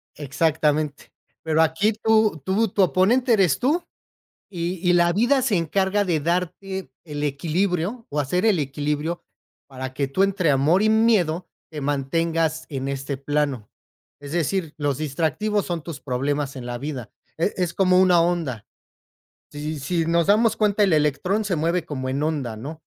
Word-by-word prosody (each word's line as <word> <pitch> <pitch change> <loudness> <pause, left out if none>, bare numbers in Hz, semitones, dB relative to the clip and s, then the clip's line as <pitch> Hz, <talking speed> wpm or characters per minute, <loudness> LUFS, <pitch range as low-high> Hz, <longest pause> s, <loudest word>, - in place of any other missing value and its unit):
Exactamente, 150 0 -1 0.3
pero 160 0 +2
aquí 165 +8 +1
tú 220 -4 +2
tú 210 +4 +2
tu 200 0 +2
oponente 230 +8 +3
eres 185 -10 +3
tú 310 +7 +1 0.7
y 175 -1 -3
y - - +6
la 175 0 +4
vida 245 +8 +2
se 235 -6 +1
encarga 190 +4 +1
de 170 -5 0
darte 180 +1 -2
el 150 -3 -6
equilibrio, 175 - -1
o 150 - -1
hacer 180 +9 0
el 210 -5 +3
equilibrio, 150 +4 -3 0.4
para 130 -1 -7
que 140 +1 -1
tú 165 +8 +1
entre 195 -4 +2
amor 145 +8 +3
y 215 - +3
miedo, 210 -7 +2 0.2
te 155 -2 -6
mantengas 160 +3 -1
en 135 -2 -4
este 135 0 -3
plano. 140 -5 -2 0.5
Es 145 0 -9
decir, 170 0 -1
los 145 -3 -1
distractivos 165 +8 -1
son 170 -3 -3
tus 165 -2 -8
problemas 140 +2 -2
en 125 -2 -7
la 120 0 -4
vida, 130 -5 -6 0.3
es 170 +5 0
es 180 -2 -1
como 185 -1 +4
una 180 -2 +5
onda. 165 -11 -1 0.9
Si 150 +1 -5
si 165 +4 -1
nos 170 0 +2
damos 215 +3 +3
cuenta, 210 -1 +2
el 195 -3 +3
electrón 155 +8 +1
se 185 -4 0
mueve 170 +2 0
como 130 -4 -4
en 135 +2 -2
onda, 145 -8 -2
¿no?, 150 +8 -8
165 Hz, 165 wpm, -23 LUFS, 145-190 Hz, 0.9 s, y